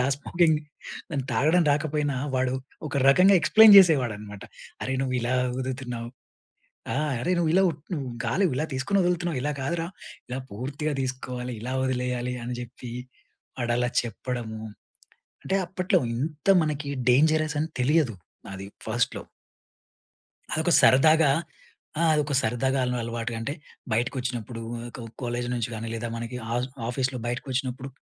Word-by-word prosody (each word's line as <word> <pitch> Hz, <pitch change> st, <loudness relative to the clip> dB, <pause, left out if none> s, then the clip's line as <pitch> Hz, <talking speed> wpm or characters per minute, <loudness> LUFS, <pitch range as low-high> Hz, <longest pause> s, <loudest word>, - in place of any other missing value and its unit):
ఆ -, -, +2 dB
స్మోకింగ్ 160 Hz, +1 st, +2 dB, 0.5 s
దాని 140 Hz, -4 st, -2 dB
తాగడం 160 Hz, +9 st, +4 dB
రాకపోయినా, 145 Hz, -1 st, -1 dB, 0.2 s
వాడు 130 Hz, 0 st, +1 dB, 0.3 s
ఒక 140 Hz, -, -7 dB
రకంగా 185 Hz, +8 st, +6 dB
ఎక్స్‌ప్లెయిన్ 220 Hz, -2 st, +8 dB
చేసేవాడన్నమాట. 115 Hz, -, +2 dB, 0.4 s
"అరేయ్, 130 Hz, 0 st, -1 dB
నువ్వు 130 Hz, -1 st, -2 dB
ఇలా 120 Hz, +2 st, 0 dB, 0.2 s
ఊదుతున్నావు. 125 Hz, -2 st, -4 dB, 0.9 s
ఆ! -, -, -2 dB, 0.2 s
అరె 175 Hz, +9 st, -1 dB
నువ్వు 170 Hz, -2 st, +2 dB
ఇలా 190 Hz, -, +5 dB
ఊప్ 160 Hz, -3 st, -3 dB
నువ్వు 140 Hz, -6 st, -3 dB
గాలి 120 Hz, +12 st, +1 dB
ఇలా 150 Hz, +4 st, 0 dB
తీసుకొని 195 Hz, +10 st, +1 dB
వదులుతున్నావు. 175 Hz, -4 st, 0 dB
ఇలా 145 Hz, +3 st, -1 dB
కాదురా, 165 Hz, +5 st, -2 dB, 0.4 s
ఇలా 125 Hz, +1 st, -4 dB
పూర్తిగా 140 Hz, +8 st, -3 dB
తీసుకోవాలి, 125 Hz, -1 st, -4 dB
ఇలా 125 Hz, +3 st, -4 dB
వదిలేయాలి" 125 Hz, -1 st, -1 dB
అని 120 Hz, +1 st, -4 dB
చెప్పి, 120 Hz, 0 st, -8 dB, 0.7 s
వాడు 120 Hz, -1 st, 0 dB
అలా 125 Hz, 0 st, +1 dB
చెప్పడము, 120 Hz, -2 st, -5 dB, 0.8 s
అంటే 190 Hz, -, 0 dB
అప్పట్లో 185 Hz, +1 st, +1 dB, 0.2 s
ఇంత 150 Hz, +5 st, -4 dB, 0.2 s
మనకి 150 Hz, -2 st, -3 dB, 0.2 s
డేంజరస్ 155 Hz, +3 st, +3 dB
అని 160 Hz, -, -2 dB
తెలియదు 145 Hz, -4 st, +2 dB, 0.3 s
నాది 95 Hz, 0 st, -7 dB, 0.2 s
ఫస్ట్‌లో. 115 Hz, +2 st, -1 dB, 1.3 s
అదొక 160 Hz, +2 st, +1 dB
సరదాగా, 155 Hz, +3 st, +6 dB, 0.7 s
ఆ! -, -, +2 dB
అదొక 150 Hz, -1 st, 0 dB
సరదాగా, 130 Hz, +4 st, 0 dB
అయిన 125 Hz, 0 st, -1 dB
అలవాటుగా 115 Hz, 0 st, -3 dB
అంటే, 140 Hz, +6 st, -3 dB, 0.4 s
బయటకొచ్చినప్పుడు 120 Hz, 0 st, -2 dB, 0.2 s
ఆహ్, 115 Hz, -, -7 dB, 0.2 s
ఒక -, -, -9 dB
కాలేజ్ 120 Hz, 0 st, -2 dB
నుంచి 120 Hz, -2 st, -1 dB
కానీ, 115 Hz, +1 st, -5 dB
లేదా 115 Hz, +1 st, -3 dB
మనకి 115 Hz, +1 st, -5 dB, 0.2 s
ఆస్ 125 Hz, +1 st, -1 dB, 0.2 s
ఆఫీస్‌లో 125 Hz, +1 st, -1 dB
బయటకొచ్చినప్పుడు, 130 Hz, +1 st, -3 dB
130 Hz, 135 wpm, -26 LUFS, 120-155 Hz, 1.3 s, ఎక్స్‌ప్లెయిన్